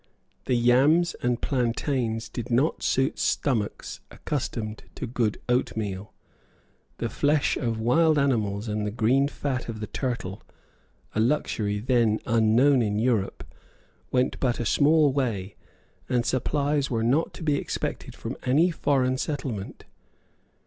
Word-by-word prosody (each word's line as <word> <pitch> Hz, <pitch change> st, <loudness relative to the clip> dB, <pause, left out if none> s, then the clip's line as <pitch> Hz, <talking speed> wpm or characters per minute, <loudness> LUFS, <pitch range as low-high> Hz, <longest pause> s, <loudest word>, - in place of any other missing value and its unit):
The 125 Hz, -, +1 dB
yams 135 Hz, +9 st, +4 dB
and 120 Hz, -1 st, 0 dB
plantains 120 Hz, -2 st, -1 dB
did 120 Hz, 0 st, -6 dB
not 130 Hz, +7 st, +1 dB
suit 135 Hz, +2 st, 0 dB
stomachs 115 Hz, -8 st, -1 dB
accustomed 115 Hz, -6 st, -4 dB
to -, -, -4 dB
good 115 Hz, -3 st, -1 dB
oatmeal. 105 Hz, -5 st, -1 dB, 0.9 s
The -, -, -2 dB
flesh 145 Hz, 0 st, +1 dB
of 115 Hz, -2 st, -2 dB
wild 155 Hz, +7 st, +3 dB
animals 110 Hz, -7 st, 0 dB
and 105 Hz, 0 st, -2 dB
the 105 Hz, -, -1 dB
green 120 Hz, +6 st, +2 dB
fat 135 Hz, -4 st, -3 dB
of 110 Hz, -2 st, -5 dB
the 110 Hz, -, -3 dB
turtle, 115 Hz, -6 st, -4 dB, 0.7 s
a -, -, -1 dB
luxury 110 Hz, -4 st, 0 dB
then 115 Hz, -1 st, +2 dB
unknown 115 Hz, +4 st, +4 dB
in 105 Hz, -2 st, 0 dB
Europe, 110 Hz, -3 st, 0 dB, 0.7 s
went 130 Hz, 0 st, 0 dB
but 125 Hz, -3 st, 0 dB
a 120 Hz, -, -2 dB
small 150 Hz, +3 st, +4 dB
way; 105 Hz, -9 st, -2 dB, 0.5 s
and 120 Hz, -2 st, +1 dB
supplies 140 Hz, +2 st, 0 dB
were 115 Hz, -2 st, -1 dB
not 135 Hz, +8 st, +2 dB
to -, -, -8 dB
be 150 Hz, -2 st, +2 dB
expected -, -, -4 dB
from -, -, -6 dB
any 150 Hz, +8 st, +3 dB
foreign 130 Hz, -5 st, +1 dB
settlement. 130 Hz, -10 st, -4 dB
125 Hz, 135 wpm, -26 LUFS, 110-140 Hz, 0.9 s, yams